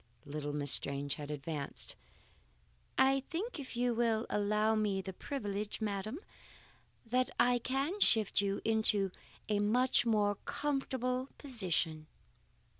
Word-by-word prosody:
Little 145 Hz, 0 st, -4 dB
Miss 145 Hz, -1 st, -1 dB
Strange 140 Hz, 0 st, +2 dB
had 145 Hz, -1 st, -7 dB
advanced. 150 Hz, 0 st, -3 dB, 1.0 s
"I 270 Hz, +1 st, +5 dB
think, 370 Hz, +3 st, -3 dB
if 255 Hz, -3 st, -7 dB
you 245 Hz, 0 st, +2 dB
will 230 Hz, -1 st, +1 dB
allow 210 Hz, +1 st, +2 dB
me 210 Hz, -3 st, +1 dB
the 190 Hz, 0 st, -5 dB
privilege, 210 Hz, -3 st, -4 dB
madam, 215 Hz, +3 st, -3 dB, 0.9 s
that 250 Hz, +2 st, +1 dB
I 245 Hz, 0 st, +4 dB
can 275 Hz, -, -1 dB
shift 220 Hz, -, +4 dB
you 200 Hz, 0 st, -1 dB
into 215 Hz, -3 st, +4 dB, 0.4 s
a 210 Hz, -1 st, +1 dB
much 245 Hz, +6 st, +3 dB
more 205 Hz, -2 st, +2 dB
comfortable 260 Hz, -2 st, -1 dB
position." 175 Hz, -, -1 dB
215 Hz, 120 wpm, -34 LUFS, 195-255 Hz, 1.0 s, I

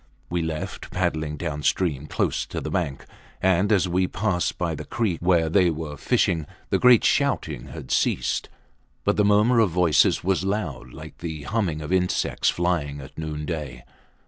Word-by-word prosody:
We 85 Hz, -1 st, 0 dB
left, 80 Hz, -1 st, -4 dB
paddling 80 Hz, -4 st, -1 dB
downstream 75 Hz, -1 st, -1 dB
close -, -, -1 dB
to -, -, -4 dB
the -, -, -5 dB
bank; 70 Hz, -1 st, -2 dB, 0.3 s
and 95 Hz, +2 st, +2 dB
as 95 Hz, -3 st, +3 dB
we 90 Hz, +1 st, +1 dB
passed 95 Hz, -4 st, -1 dB
by 85 Hz, -2 st, -1 dB
the 75 Hz, -, -6 dB
creek 110 Hz, -8 st, -1 dB
where 85 Hz, -2 st, +3 dB
they 90 Hz, +2 st, +4 dB
were 80 Hz, -2 st, -4 dB
fishing, 85 Hz, -, +1 dB, 0.2 s
the -, -, +2 dB
great 125 Hz, -2 st, +6 dB
shouting -, -, 0 dB
had 65 Hz, -1 st, -9 dB
ceased, 60 Hz, -, 0 dB, 0.5 s
but -, -, +2 dB
the 105 Hz, -, +3 dB
murmur 105 Hz, +4 st, +4 dB
of 110 Hz, -4 st, +4 dB
voices 85 Hz, -3 st, +3 dB
was 95 Hz, 0 st, +1 dB
loud 80 Hz, -, -3 dB
like -, -, -11 dB
the 80 Hz, -3 st, -5 dB
humming 90 Hz, -4 st, -1 dB
of 75 Hz, -, -3 dB
insects 90 Hz, -1 st, +1 dB
flying 85 Hz, -5 st, -1 dB
at 65 Hz, 0 st, -11 dB
noonday. 75 Hz, -4 st, -5 dB
85 Hz, 165 wpm, -24 LUFS, 75-95 Hz, 0.5 s, great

